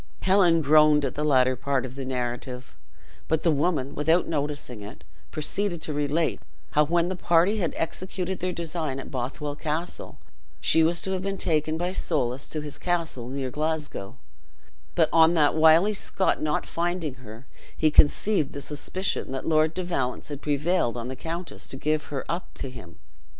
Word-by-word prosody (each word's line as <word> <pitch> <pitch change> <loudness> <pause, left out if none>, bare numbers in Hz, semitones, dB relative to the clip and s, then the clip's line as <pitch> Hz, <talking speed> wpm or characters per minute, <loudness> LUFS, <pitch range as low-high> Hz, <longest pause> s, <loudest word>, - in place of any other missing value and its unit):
Helen 180 -4 +4
groaned 150 0 +5
at 130 - -2
the 150 - -3
latter 130 -3 +4
part 135 +1 -1
of 125 - -8
the 135 0 -6
narrative, 125 0 -4 0.5
but 160 0 0
the 165 - +4
woman, 145 -2 0
without 160 +4 +2
noticing 145 -6 -3
it, 105 - -10 0.3
proceeded 175 +4 -1
to 155 - -3
relate 150 +3 0 0.3
how, 150 0 +4
when 170 +1 +2
the 185 - -2
party 175 +4 +3
had 175 -6 -1
executed 185 +2 -3
their 185 0 -1
design 160 -5 -3
at - - -8
Bothwell 135 +3 -4
Castle, 155 +3 -4 0.4
she 160 - +4
was 165 +1 +2
to 190 - -2
have 190 -1 -1
been 195 +1 -3
taken 155 -2 0
by 175 +2 -1
Soulis 135 -7 -1
to 155 - -3
his 150 -1 -7
castle 165 -9 -2
near 130 -1 -3
Glasgow; 150 -7 -3 0.8
but - - +4
on 165 +1 +6
that 150 -3 +4
wily 160 +6 +5
Scot 195 -1 0
not 150 -1 0
finding 170 -3 -2
her, 115 +2 -11 0.3
he 155 -1 +3
conceived 155 +2 +3
the 140 - -5
suspicion 165 +7 -2
that 135 -1 -4
Lord 155 0 +3
de 185 - -2
Valence 135 -9 -2
had 145 -1 -6
prevailed 145 -3 0
on 120 +1 -4
the 130 - -5
countess 165 +5 -5
to 135 - -6
give 155 +2 0
her 140 -2 -5
up 170 +2 -4
to 135 - -5
him. 90 -10 -12
155 Hz, 175 wpm, -26 LUFS, 135-170 Hz, 0.8 s, on